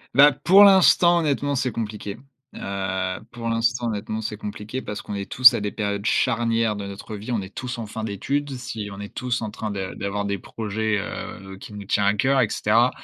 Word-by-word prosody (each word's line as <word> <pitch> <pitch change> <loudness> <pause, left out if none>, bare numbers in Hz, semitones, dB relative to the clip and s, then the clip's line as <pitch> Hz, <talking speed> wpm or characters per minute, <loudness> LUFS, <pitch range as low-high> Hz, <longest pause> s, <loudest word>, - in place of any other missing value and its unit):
Bah, 145 +3 +8
pour 190 +8 +6
l'instant 185 -3 +6
honnêtement, 145 -2 0
c'est 130 -1 0
compliqué. 105 -2 -5 0.4
Heu, 95 -1 -3
pour 120 -1 -6
l'instant 120 +2 0
honnêtement, 110 0 -4
c'est 110 -1 -4
compliqué 105 +4 -6
parce 105 -4 -6
qu'on - - -7
est 100 -1 -5
tous 130 0 +8
à - - -2
des 105 0 -2
périodes 100 -1 -3
charnières 115 -3 +1
de 100 -1 -5
notre 100 +2 -8
vie. 105 +4 -6
On 115 -4 0
est 95 +1 -11
tous 125 -1 -5
en 115 - -5
fin 110 +1 -6
d'études. 140 +8 -2
Si, 115 -4 -6
on 100 - -9
est 100 0 -8
tous 125 -2 -2
en 105 - -4
train 110 0 -5
de 95 -2 -4
d'avoir 100 +1 -2
des 100 -1 -2
projets, 110 +1 -2
heu, 95 -1 -7
qui 105 - -11
nous 100 -1 -8
tient 100 +1 +1
à 100 +1 +3
cœur, 135 +3 +3
et 115 - +1
cetera 115 +4 +3
110 Hz, 215 wpm, -23 LUFS, 100-125 Hz, 0.4 s, Bah